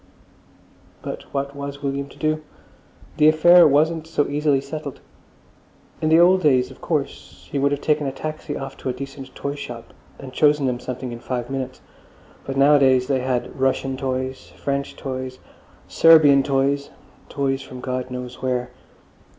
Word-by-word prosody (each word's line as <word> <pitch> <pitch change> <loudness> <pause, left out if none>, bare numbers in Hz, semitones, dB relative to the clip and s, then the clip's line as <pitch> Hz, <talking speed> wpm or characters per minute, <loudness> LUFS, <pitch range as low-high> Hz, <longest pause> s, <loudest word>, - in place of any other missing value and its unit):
But - - -7
what 140 0 -3
was 140 0 -7
William 140 0 -2
to - - -16
do? 155 0 0 0.8
The 150 - +5
affair 170 +2 +7
wasn't 155 +3 +2
so 155 -3 0
easily 145 -1 +1
settled. 140 0 -7 1.0
In 155 - +1
the 160 +1 +6
old 185 +2 +5
days, 130 -6 +3
of - - -15
course, - - -4
he 140 - -1
would 140 +1 +2
have 145 0 -2
taken 150 -2 +1
a - - -1
taxi 155 0 -5
off 135 0 -7
to - - -4
a - - -1
decent 135 +1 -8
toyshop 140 -5 -6 0.2
and 130 -1 -10
chosen 150 -1 +3
them 125 -1 -1
something 125 0 -6
in 120 - -7
five 120 0 -4
minutes. 135 -1 -4 0.6
But 135 0 -4
nowadays 135 -2 +5
they 135 0 0
had 130 0 -3
Russian 135 0 0
toys, 130 0 -4
French 140 0 -3
toys, 130 -1 -5 0.5
Serbian 155 -4 +6
toys—toys 135 0 -2
from 130 - -10
God 130 0 -4
knows 125 0 -7
where. 125 -1 -2
140 Hz, 155 wpm, -22 LUFS, 130-145 Hz, 1.0 s, affair